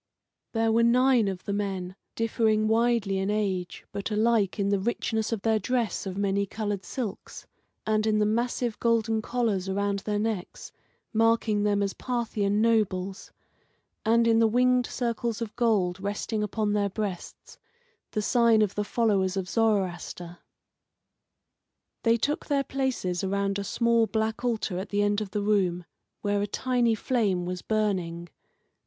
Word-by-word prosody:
There 225 -1 +2
were 230 +1 +3
nine 245 -1 +4
of 190 -2 -4
the 200 - -2
men, 190 -3 -3 0.2
differing 220 -1 +1
widely 225 -3 +2
in 190 +1 -1
age, 195 -4 -2
but 200 +1 -4
alike 215 -2 +2
in 200 -1 0
the 200 -1 +2
richness 220 +1 -1
of 225 -4 -2
their 220 -1 +2
dress 235 -1 -1
of 190 0 -5
many 200 0 0
coloured 205 -1 -3
silks, 230 -7 -6 0.4
and 215 0 +1
in 215 -1 +2
the 210 - +3
massive 235 +1 -1
golden 225 -1 +1
collars 215 -6 -1
around 200 +1 0
their 210 +1 -2
necks, 210 -4 -3 0.4
marking 225 -1 +2
them 205 -1 +2
as 195 - -1
Parthian 215 -4 -1
nobles, 200 -4 0 0.7
and 230 +1 +3
in 225 0 +4
the 225 - +5
winged 250 +2 +3
circles 235 -2 -2
of 230 -3 -5
gold 205 -7 +1
resting 205 +2 -3
upon 210 0 -1
their 205 -1 +1
breasts, 195 -3 -6 0.5
the 215 - -2
sign 230 -1 +4
of 205 - -1
the 210 - -1
followers 200 -4 +1
of 190 -1 -2
Zoroaster. 180 -4 -1 1.6
They 230 0 +3
took 290 +6 -2
their 280 -2 +1
places 255 -11 -2
around 200 +1 0
a - - -2
small 235 +2 +2
black 220 +1 -2
altar 220 -6 -1
at 190 +2 -6
the 205 0 +1
end 205 +1 +1
of 210 - -4
the 205 +1 -2
room, 185 -4 +1 0.4
where 205 -1 0
a 205 - -1
tiny 240 +1 +1
flame 205 -7 0
was 180 0 -4
burning. 180 -6 -1
215 Hz, 155 wpm, -27 LUFS, 195-230 Hz, 1.6 s, the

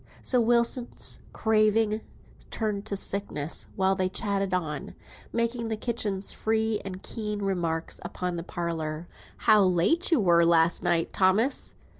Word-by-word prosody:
So 250 -2 +2
Wilson's 235 +1 +1
craving 215 0 +2 0.5
turned 210 -2 -3
to 200 - -2
sickness, 190 -6 -2
while 190 0 +2
they 185 -1 0
chattered 195 -1 -1
on, 155 -6 -3 0.4
making 235 0 -1
the 220 -1 -2
kitchen's 210 -4 -1
free 220 -1 0
and 190 -1 -7
keen 210 -2 -4
remarks 170 -4 -2
upon 180 -1 -3
the 170 - -3
parlour. 165 -2 -4 0.4
"How 210 -2 +6
late 185 - +2
you 325 -6 +4
were 170 -4 +4
last 165 0 +3
night, 170 -1 +1
Thomas!" 200 +8 +2
200 Hz, 135 wpm, -27 LUFS, 175-220 Hz, 0.5 s, How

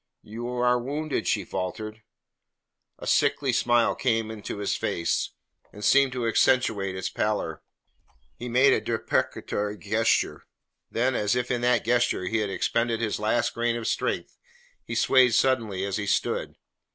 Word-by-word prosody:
"You 115 +3 -6
are 125 0 +1
wounded?" 145 +5 -3
she 100 -4 0
faltered. 110 +5 -5 1.0
A - - -9
sickly 135 -3 +2
smile 120 0 +3
came 115 -3 0
into 105 -1 -6
his 100 -1 -1
face, 85 0 -1 0.4
and 105 0 -7
seemed 140 -1 +5
to 125 -2 -2
accentuate 110 -5 +2
its 95 - -3
pallor. 105 -7 -2 0.7
He 125 - -7
made 130 +3 +5
a - - +1
deprecatory 105 0 -2
gesture. 85 - 0 0.4
Then, 125 +3 +1
as 105 -1 +1
if 125 0 -1
in 120 -1 0
that 120 -2 +2
gesture 120 -5 +1
he 110 +5 0
had 105 -2 -1
expended 115 +5 0
his 115 -3 -1
last 110 +3 +1
grain 120 0 0
of 115 -1 -4
strength, - - -2 0.5
he - - -6
swayed 130 -3 +4
suddenly 110 -8 +1
as 100 -1 -2
he 100 -1 -3
stood. 100 - -1
115 Hz, 150 wpm, -26 LUFS, 105-125 Hz, 1.0 s, seemed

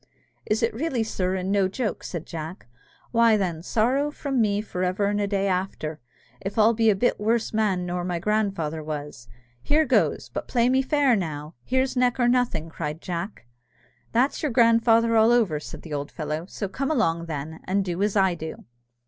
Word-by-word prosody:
"Is 215 +2 +1
it 230 - +1
really, 255 -1 -1
sir, 185 -4 -1
and 190 +1 -2
no 200 -2 +3
joke?" 215 +3 -3
said 170 -3 -5
Jack; 165 +2 -7 0.5
"why, 230 -2 +5
then, 175 -5 -2
sorrow 250 - +1
from 275 -4 -1
me 205 -2 +2
for 185 -4 -4
ever 185 +3 0
and 205 +1 0
a 200 - 0
day 200 -1 0
after, 180 -5 -2 0.4
if 195 +3 -5
I'll 220 +1 +5
be 225 0 +3
a 210 - +4
bit 245 +6 +1
worse 225 +2 0
man 200 -5 +1
nor 175 0 -2
my 175 -1 -2
grandfather 175 -6 -1
was! 145 -5 -6 0.3
Here 310 - +2
goes - - +1
but - - -5
play 240 -1 +2
me 260 +1 +3
fair 275 -2 +3
now. 155 -5 -4
Here's 260 +1 0
neck 250 0 +2
or 245 - +4
nothing!" 240 -10 +1
cried 155 -1 -5
Jack. 175 - -5 0.7
"That's 255 +4 +1
your 300 - 0
grandfather 230 -1 +4
all 220 +1 +5
over," 215 -11 +2
said - - -9
the 160 - -7
old 145 0 -3
fellow; 155 +1 -4
"so 200 - -4
come 265 +8 -3
along, 170 - +1
then, 155 +1 -5
and 195 +1 0
do 180 0 -3
as 205 0 +1
I 190 -3 +4
do." 160 -1 -7
200 Hz, 195 wpm, -25 LUFS, 170-235 Hz, 0.7 s, why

